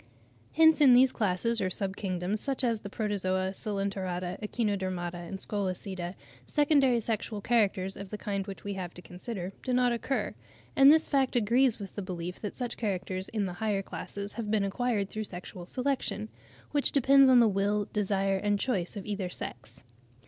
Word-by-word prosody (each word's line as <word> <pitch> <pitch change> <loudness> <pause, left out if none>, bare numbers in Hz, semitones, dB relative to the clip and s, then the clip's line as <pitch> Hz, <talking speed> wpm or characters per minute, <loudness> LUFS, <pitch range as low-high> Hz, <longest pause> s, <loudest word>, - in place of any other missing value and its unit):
Hence 320 -1 +6
in 260 -4 +8
these 255 +1 +6
classes 225 +2 0
or 185 - +1
sub 190 +1 -1
kingdoms, 190 +1 -2
such 275 -1 -1
as 230 -3 +1
the 200 - -8
Protozoa, 190 -3 -1
Coelenterata, 190 -3 -3
Echinodermata, 185 -5 -2
Scolecida, 190 -3 -3 0.3
secondary 280 -5 +4
sexual 220 -1 -2
characters, 195 -4 +1
of 195 -1 -8
the 210 - -5
kind 200 -1 -3
which 195 - -8
we 200 - -3
have 180 -3 -6
to 180 - -9
consider, 185 0 -6
do 255 - -3
not 250 0 +3
occur: 240 +3 -1 0.4
and 275 +1 +8
this 315 +1 +4
fact 270 -3 +1
agrees 240 +2 +3
with 200 -3 -8
the 205 - -4
belief 180 -2 -5
that 210 - -5
such 245 -2 -4
characters 190 -3 -3
in 215 -3 -1
the 180 - -4
higher 205 -3 0
classes 200 +1 -6
have 230 -3 -4
been 210 -1 +2
acquired 205 0 0
through 215 0 -3
sexual 180 -1 -8
selection, 250 -5 -2 0.4
which 290 -1 +2
depends 275 0 +6
on 255 -1 +7
the 235 - +6
will, 205 +1 +1
desire, 195 -2 +1
and 205 +1 0
choice 200 -6 -1
of 195 - -6
either 200 -3 -3
sex. 120 -6 -6
205 Hz, 175 wpm, -29 LUFS, 190-235 Hz, 0.4 s, in